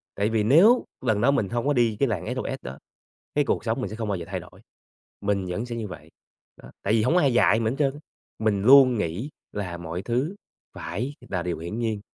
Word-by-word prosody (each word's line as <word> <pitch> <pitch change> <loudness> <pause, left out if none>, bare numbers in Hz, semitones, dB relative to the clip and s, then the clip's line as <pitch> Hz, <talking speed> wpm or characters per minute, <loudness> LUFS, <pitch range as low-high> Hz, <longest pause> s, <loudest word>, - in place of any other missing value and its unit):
tại 100 +2 0
vì 110 -1 +1
nếu 180 - +6 0.2
lần 110 -3 +2
đó 135 - +4
mình 110 -9 0
hông 120 +3 -2
có 145 - +3
đi 120 -5 +2
cái 140 - +3
làng 100 -7 -2
SOS - - -3
đó, 65 +2 -8 0.6
cái 145 - +3
cuộc - - -1
sống 115 +3 -1
mình - - -3
sẽ 110 - -6
không 110 -1 -4
bao 100 - 0
giờ 85 - -6
thay - - -3
đổi, - - -15 0.6
mình 100 -2 -1
vẫn 105 +7 -3
sẽ 120 - -5
như 110 -3 -4
vậy. 80 -3 -10 0.5
Đó, - - -12
tại 100 - 0
vì 110 - +3
hổng 165 - +2
ai 140 -7 +4
dạy 115 -2 +4
mình 110 0 0
hết - - -5
trơn 140 -3 +2
á, - - -10 0.4
mình 105 -3 +1
luôn 130 0 +7
nghĩ 105 - -3 0.2
là 90 -4 -4
mọi 85 +2 -5
thứ 130 +10 -1 0.4
phải 115 - -4
là 90 -2 -2
điều 85 -2 -3
hiển 85 +7 -5
nhiên, 110 -3 -1
110 Hz, 240 wpm, -25 LUFS, 100-125 Hz, 0.6 s, luôn